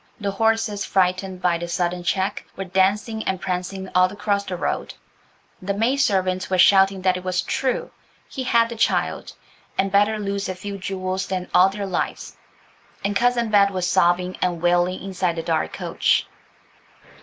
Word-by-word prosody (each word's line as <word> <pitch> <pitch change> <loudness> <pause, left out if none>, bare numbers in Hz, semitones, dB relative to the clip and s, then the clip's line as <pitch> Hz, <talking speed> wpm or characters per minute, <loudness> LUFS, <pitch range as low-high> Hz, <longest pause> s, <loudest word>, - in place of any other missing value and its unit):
The 200 -2 -2
horses, 225 0 0
frightened 185 0 0
by 175 -2 +2
the 175 - -4
sudden 175 +1 -1
check, 190 +2 -1
were 195 - -4
dancing 200 +4 +1
and 190 -1 -1
prancing 185 +1 -4
all 185 0 +4
across 200 0 -1
the 185 -2 -5
road: - - -3 0.7
the 195 +2 -2
maidservants 200 -6 +1
were 185 - +1
shouting 195 +1 +5
that 185 -1 +2
it 185 - -8
was 185 0 -1
true; 260 -2 -2 0.4
he 265 - -6
had 235 -2 +3
the 235 - -6
child, 225 - 0 0.4
and 195 0 +1
better 205 +2 +3
lose 200 -1 -3
a 185 - -3
few 200 +2 -7
jewels 185 0 -3
than 185 -1 -3
all 185 +2 +6
their 200 +1 -5
lives, 190 - -3 0.7
and 200 0 0
Cousin 240 0 +2
Bet 200 -1 +5
was 185 -2 -2
sobbing 180 +1 +2
and 175 -2 0
wailing 175 +2 +1
inside 185 -3 -1
the 165 - -4
dark 160 -1 -1
coach. - - +1
190 Hz, 165 wpm, -22 LUFS, 180-205 Hz, 0.7 s, all